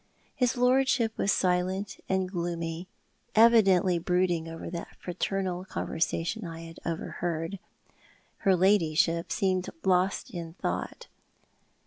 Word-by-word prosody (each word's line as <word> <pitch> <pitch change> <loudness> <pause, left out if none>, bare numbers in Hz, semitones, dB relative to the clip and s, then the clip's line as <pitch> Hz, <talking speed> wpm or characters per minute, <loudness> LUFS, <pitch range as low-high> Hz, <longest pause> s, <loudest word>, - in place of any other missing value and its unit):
His 250 0 +1
lordship 250 -2 +3
was 200 - +1
silent 185 +3 0
and 190 -1 +1
gloomy, 170 -1 -3 0.5
evidently 195 -6 +5
brooding 175 -1 +1
over 165 0 -7
that 170 -1 -6
fraternal 185 0 -2
conversation 175 +3 -2
I 165 -2 -7
had 165 -1 -10
overheard. 165 +2 -3 0.8
Her 190 -1 +3
ladyship 170 -3 +2
seemed 190 -3 0
lost 185 +5 +1
in 170 -4 -6
thought. - - -4
180 Hz, 105 wpm, -28 LUFS, 170-195 Hz, 0.8 s, evidently